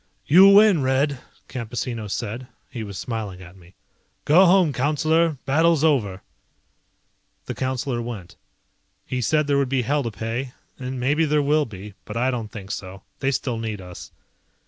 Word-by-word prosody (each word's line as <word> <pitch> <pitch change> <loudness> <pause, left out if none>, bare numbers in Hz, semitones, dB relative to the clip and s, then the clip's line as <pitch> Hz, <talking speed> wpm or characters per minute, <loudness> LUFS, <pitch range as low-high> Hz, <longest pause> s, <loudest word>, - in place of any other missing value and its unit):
"You 190 +6 +8
win, 200 -4 +6
Red," 135 +1 +1 0.3
Campesino 115 -2 -4
said. 115 +4 -4 0.2
He 120 - -6
was 100 -3 -7
smiling 110 -6 -5
at 90 +1 -14
me. 90 0 -19 0.5
"Go 180 +6 +6
home, 180 -4 +4
Councillor, 155 +3 +1
battle's 160 +2 +3
over." 110 -12 +1 1.2
The - - -4
Councillor 130 -1 -2
went. 115 -7 -7 0.7
He 125 -1 -3
said 150 +6 +2
there 140 -1 +2
would 135 -2 0
be 130 -2 +1
hell 145 +5 +1
to 120 - -3
pay, 115 +5 -4 0.3
and 130 0 -5
maybe 145 +6 +2
there 150 -1 +2
will 150 +1 +2
be, 105 -3 -10
but 105 - -6
I 125 +2 +1
don't 115 -4 -4
think 100 -2 -8
so, 95 +1 -7 0.2
they 135 - 0
still 125 -3 -2
need 110 -2 -4
us. 90 -1 -10
130 Hz, 165 wpm, -23 LUFS, 110-145 Hz, 1.2 s, You